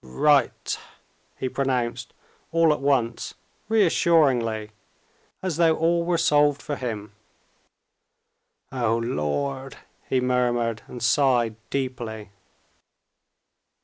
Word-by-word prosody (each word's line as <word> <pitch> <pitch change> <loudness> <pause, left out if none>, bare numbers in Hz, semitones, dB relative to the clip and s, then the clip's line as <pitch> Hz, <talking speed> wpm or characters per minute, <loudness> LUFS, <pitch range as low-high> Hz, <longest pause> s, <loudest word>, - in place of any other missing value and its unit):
"Right!" 135 - +1 0.6
he 130 - -2
pronounced 125 -3 -2 0.4
all 165 -2 +4
at - - -4
once 130 -4 0 0.3
reassuringly, 140 - +2 0.7
as 180 -5 -2
though 165 -2 +4
all 170 +1 +1
were 170 0 +1
solved 145 -3 +3
for 145 - -4
him. 110 -6 -5 1.6
"O 120 -3 0
Lord!" 130 - -2 0.3
he 130 - +2
murmured, 120 -3 0
and 120 -2 -8
sighed 120 -4 +3
deeply. 120 -6 -4
130 Hz, 90 wpm, -24 LUFS, 115-150 Hz, 1.6 s, all